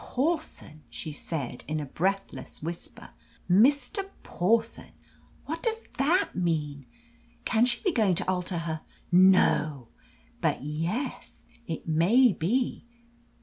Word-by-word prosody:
Pawson!" 290 - -3
she 155 - -6
said, 145 -5 -4
in 155 0 -2
a 150 - -4
breathless 195 +3 -3
whisper. 170 - -7 0.4
"Mr. 280 - +3
Pawson 225 +5 0 0.5
what 320 +3 -4
does 455 -1 -2 0.2
that 330 +8 +2
mean? 150 -6 -2 0.6
Can 230 +2 +3
she 240 -1 -2
be 380 - +2
going 210 - +2
to - - -2
alter 180 -1 -1
her 160 -1 -3 0.3
no! 155 -8 +4 0.5
But - - 0
yes, 165 - -4 0.2
it 160 - -5
may 195 +10 +4
be! 235 +8 -1
185 Hz, 115 wpm, -28 LUFS, 160-250 Hz, 0.6 s, no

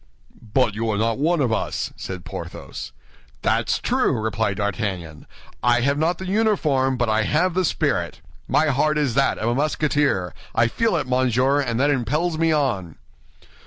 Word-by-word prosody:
"But 125 -5 +3
you 115 +2 -2
are 105 - 0
not 115 +3 0
one 165 +2 +2
of 120 -4 +1
us," - - -2
said 90 -2 -7
Porthos. - - -7 0.5
"That's - - +1
true," - - +1
replied 110 -2 -1
D'Artagnan; 95 -7 -3 0.3
"I 120 +1 +3
have 140 +3 +1
not 165 +2 +1
the 190 - -7
uniform, 165 - +1
but 120 -1 +1
I 110 0 +2
have 165 - +1
the 185 +2 +1
spirit. 165 - -1 0.3
My 155 0 +2
heart 150 +3 +2
is 145 -5 +1
that 135 +2 +2
of 110 - -2
a - - +1
Musketeer; 145 - 0 0.2
I 115 +1 +3
feel 230 - +1
it, 155 - 0
monsieur, 130 +2 +2
and 120 -3 -2
that 145 +2 +3
impels 150 +6 0
me 165 0 +3
on." 120 - 0
130 Hz, 170 wpm, -22 LUFS, 110-155 Hz, 0.5 s, But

